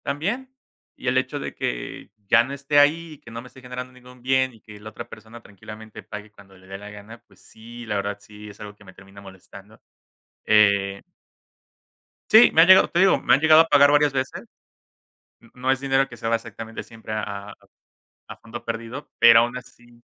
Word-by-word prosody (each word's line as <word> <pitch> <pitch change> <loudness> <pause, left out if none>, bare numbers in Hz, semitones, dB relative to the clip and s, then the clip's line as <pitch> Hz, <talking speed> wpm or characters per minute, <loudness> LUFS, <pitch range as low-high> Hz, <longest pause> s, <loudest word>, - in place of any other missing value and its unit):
También, 200 - -3 0.5
y - - -10
el 125 +1 +1
hecho 130 +3 -2
de - - -6
que - - -5 0.2
ya 115 +3 +5
no 135 +3 -7
esté 140 +1 +1
ahí 160 +3 +2
y - - -14
que - - -15
no 115 +1 -8
me 125 - -13
esté 130 - -17
generando 125 0 -8
ningún 125 0 -17
bien 130 0 +1
y 110 - -20
que 105 -1 -14
la 110 +1 -10
otra 110 - -10
persona 110 +2 -13
tranquilamente 110 +2 -12
pague 105 0 -10
cuando 95 -2 -19
le 95 - -20
dé 95 0 -8
la 105 0 -10
gana, 105 +3 -13
pues - - -24
sí, 115 +2 -13
la 105 - -3
verdad 100 0 -3
sí 105 +1 -13
es 105 - -15
algo 105 0 -10
que 105 - -20
me 95 -2 -15
termina 95 +2 -16
molestando, 100 +2 -15 0.7
eh 100 -2 +3 1.3
Sí, 220 +3 +7
me 160 - +6
han 170 - +6
llegado 190 0 +7
te 170 - -1
digo, 190 +1 +4
me - - +3
han - - +4
llegado 160 0 +7
a 165 - 0
pagar 145 -1 +5
varias 145 -1 +3
veces. 130 0 -4 1.0
N 115 - -22
no 130 +1 -1
es 135 - 0
dinero 135 0 +1
que 120 - -13
se 115 - -5
va 115 - +2
exactamente 115 0 -8
siempre 110 -1 -10
a 100 -1 -6 0.8
a - - -8
fondo 115 +1 -10
perdido, 115 +4 -7
pero, 115 -1 +7
aun 120 +1 -1
así 120 -1 -14
115 Hz, 210 wpm, -23 LUFS, 105-135 Hz, 1.3 s, Sí